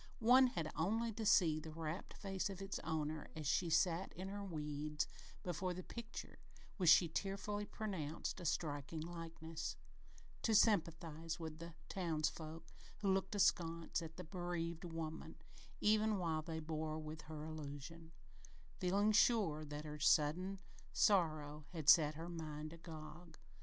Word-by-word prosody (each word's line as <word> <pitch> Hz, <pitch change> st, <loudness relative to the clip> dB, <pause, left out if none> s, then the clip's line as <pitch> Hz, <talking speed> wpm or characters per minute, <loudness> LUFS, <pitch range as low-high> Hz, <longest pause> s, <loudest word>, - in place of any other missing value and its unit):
One 255 Hz, +3 st, +7 dB
had 165 Hz, -10 st, -3 dB
only 220 Hz, +9 st, +1 dB
to 220 Hz, 0 st, -2 dB
see 160 Hz, -5 st, +5 dB
the 160 Hz, +1 st, -8 dB
rapt 160 Hz, +2 st, -5 dB
face 195 Hz, -1 st, -2 dB
of 195 Hz, -2 st, -6 dB
its 195 Hz, 0 st, -3 dB
owner 155 Hz, -1 st, -2 dB
as 155 Hz, -1 st, -5 dB
she 165 Hz, +4 st, +2 dB
sat 170 Hz, +2 st, +2 dB
in 185 Hz, +2 st, -5 dB
her 200 Hz, +1 st, -4 dB
weeds 150 Hz, -3 st, -2 dB, 0.4 s
before 180 Hz, +1 st, -2 dB
the 185 Hz, -, -5 dB
picture, 235 Hz, -1 st, -7 dB, 0.4 s
which 180 Hz, -5 st, +4 dB
she 175 Hz, -, +8 dB
tearfully 200 Hz, +4 st, -2 dB
pronounced 185 Hz, -7 st, -3 dB
"a 175 Hz, -, -7 dB
strikin' 150 Hz, 0 st, -2 dB
likeness," 165 Hz, -1 st, -5 dB, 0.7 s
to 225 Hz, -, +3 dB
sympathize 165 Hz, -6 st, +2 dB
with 160 Hz, -1 st, -6 dB
the 170 Hz, -1 st, -8 dB
townsfolk 160 Hz, -2 st, -2 dB, 0.3 s
who 195 Hz, -2 st, +3 dB
looked 190 Hz, +1 st, 0 dB
askance 165 Hz, -5 st, +2 dB
at 165 Hz, -1 st, -8 dB
the 180 Hz, -, -5 dB
bereaved 175 Hz, -1 st, -3 dB
woman, 160 Hz, -1 st, -5 dB, 0.5 s
even 215 Hz, 0 st, +4 dB
while 165 Hz, -4 st, 0 dB
they 160 Hz, 0 st, -4 dB
bore 155 Hz, 0 st, -3 dB
with 155 Hz, 0 st, -6 dB
her 155 Hz, -1 st, -5 dB
delusion, 155 Hz, +1 st, -7 dB, 0.7 s
feeling 200 Hz, +4 st, +3 dB
sure 205 Hz, -9 st, +4 dB
that 150 Hz, 0 st, -6 dB
her 150 Hz, 0 st, -6 dB
sudden 160 Hz, +7 st, +3 dB, 0.3 s
sorrow 155 Hz, -6 st, +2 dB
had 160 Hz, -4 st, -5 dB
set 150 Hz, -1 st, +8 dB
her 165 Hz, +2 st, -6 dB
mind 155 Hz, -2 st, -5 dB
agog. 160 Hz, 0 st, -10 dB
165 Hz, 145 wpm, -39 LUFS, 155-190 Hz, 0.7 s, she